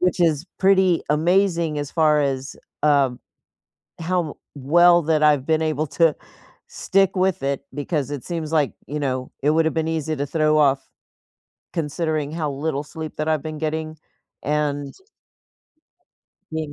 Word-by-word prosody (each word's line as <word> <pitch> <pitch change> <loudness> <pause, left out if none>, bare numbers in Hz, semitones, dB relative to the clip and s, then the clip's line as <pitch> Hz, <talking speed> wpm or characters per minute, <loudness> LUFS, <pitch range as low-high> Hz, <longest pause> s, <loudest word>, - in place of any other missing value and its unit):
Which 180 0 +1
is 160 -2 +2
pretty 190 -3 +4
amazing 170 -1 +2
as 145 -1 -4
far 155 -2 +3
as, 135 -1 -2 0.3
um, 140 -4 +2 0.8
how 170 -2 -1 0.2
well 175 +5 +5
that 155 0 +1
I've 150 -3 +4
been 160 0 +2
able 155 -1 -1
to 155 +2 +3 0.5
stick 195 0 +1
with 185 -5 +1
it 140 0 -1
because 145 -1 -2
it 145 -4 -5
seems 165 -3 -4
like, 150 -4 +2
you 150 - -4
know, 130 -2 -2
it 145 - +3
woulda 160 +1 +3
been 160 0 -1
easy 160 -1 -2
to 140 - -2
throw 155 +1 +2
off 135 -2 +2 0.9
considering 155 -2 -2
how 155 -2 -2
little 145 +1 -2
sleep 160 +1 -7
that 155 +1 -2
I've 155 -3 0
been 155 -1 -5
getting 155 0 -3 0.5
and 145 -1 -1 1.6
being 160 -2 -4
155 Hz, 145 wpm, -22 LUFS, 145-165 Hz, 1.6 s, well